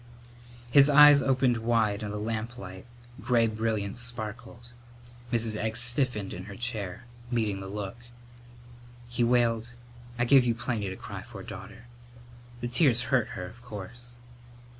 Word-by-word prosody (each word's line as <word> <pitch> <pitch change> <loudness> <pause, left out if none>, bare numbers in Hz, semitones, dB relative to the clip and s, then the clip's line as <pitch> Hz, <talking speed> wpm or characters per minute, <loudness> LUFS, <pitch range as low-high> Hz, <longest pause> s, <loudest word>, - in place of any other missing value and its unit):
His 140 +1 +7
eyes 145 0 +8
opened 130 -2 +2
wide 110 -3 +1
in 105 - -4
the 105 - -4
lamplight, 110 -2 -5 0.3
gray 120 -1 +3
brilliance 110 -1 -2
sparkled. 120 0 -6 0.6
Mrs. 115 -2 0
Egg 110 +1 -2
stiffened 120 -5 -1
in 90 - -7
her 100 -1 -9
chair, 110 -3 -3 0.3
meeting 110 -5 0
the 95 - -7
look. 100 +1 -5 1.1
He 120 0 -1
wailed, 120 -1 +2 0.4
"I 120 - +2
gave 135 +1 +6
you 120 -2 +1
plenty 110 -4 -2
to 95 - -6
cry - - -8
for, - - -10
daughter." 115 - -10 0.8
The 120 - -2
tears 120 -1 +2
hurt 125 -4 +1
her, 90 - -4
of 115 +6 -12
course. 120 +2 -9
115 Hz, 140 wpm, -28 LUFS, 105-120 Hz, 1.1 s, eyes